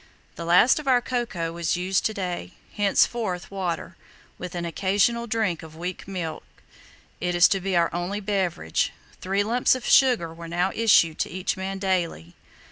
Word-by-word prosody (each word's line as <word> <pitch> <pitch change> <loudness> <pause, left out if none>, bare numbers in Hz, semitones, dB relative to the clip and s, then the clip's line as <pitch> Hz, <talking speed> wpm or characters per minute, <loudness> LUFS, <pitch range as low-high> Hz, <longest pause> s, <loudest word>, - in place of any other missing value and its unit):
The 170 - -7
last 180 - +5
of 300 - -9
our 255 -2 +5
cocoa 235 -9 -3
was 170 +1 -1
used 185 +1 +1
to 220 - -5
day. 180 - -4 0.2
Henceforth 200 -2 +1
water, 185 -4 -4 0.4
with 180 0 -6
an 170 0 -3
occasional 205 +7 +1
drink 220 -7 -1
of 160 -1 -12
weak 180 +3 -6
milk, 175 -5 -5 0.8
is 175 0 +4
to 195 - +1
be 190 0 -2
our 170 -1 +2
only 175 +4 -2
beverage. 190 - -1 0.3
Three 195 +2 0
lumps 240 +4 +2
of 255 - -6
sugar 240 -12 +4
were 170 0 -9
now 175 +3 0
issued 200 -8 +4
to - - -1
each 185 0 -2
man 190 +1 -4
daily. 175 - -2
185 Hz, 165 wpm, -25 LUFS, 170-205 Hz, 0.8 s, last